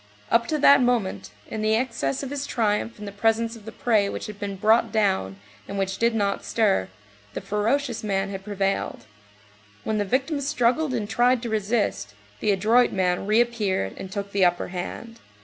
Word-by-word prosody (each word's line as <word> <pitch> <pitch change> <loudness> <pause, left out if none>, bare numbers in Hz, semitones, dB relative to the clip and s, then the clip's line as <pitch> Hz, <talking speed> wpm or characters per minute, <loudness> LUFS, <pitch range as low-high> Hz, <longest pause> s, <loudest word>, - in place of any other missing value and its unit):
Up 230 0 +3
to 310 - 0
that 280 -2 +6
moment, 245 -6 0 0.2
in 220 - -5
the 215 0 +2
excess 230 - -1
of 270 - -5
his 285 0 -3
triumph 225 0 0
in 210 - -8
the 200 - -6
presence 225 +3 0
of 220 -2 -14
the 220 - -7
prey 215 -4 +1
which - - -5
had 210 -1 -8
been 200 -1 -4
brought 220 +4 +3
down, 95 - +1 0.3
and 200 - -5
which 195 0 -2
did 230 0 +2
not 200 -2 0
stir, 200 - +1 0.5
the - - -2
ferocious 230 +4 -1
man 195 -1 -1
had 195 -1 -6
prevailed; 195 -1 -2 0.8
when 215 -1 -1
the - - +2
victim 270 - -1
struggled 270 0 +1
and 215 -3 -2
tried 240 +3 +2
to 235 - -3
resist, 205 - -1 0.2
the - - -1
adroit 220 +5 +3
man 185 0 0
reappeared 215 - +1
and 190 - -8
took 200 0 -4
the 200 -1 +2
upper 175 0 +2
hand. 225 +6 -6
215 Hz, 185 wpm, -24 LUFS, 195-235 Hz, 0.8 s, that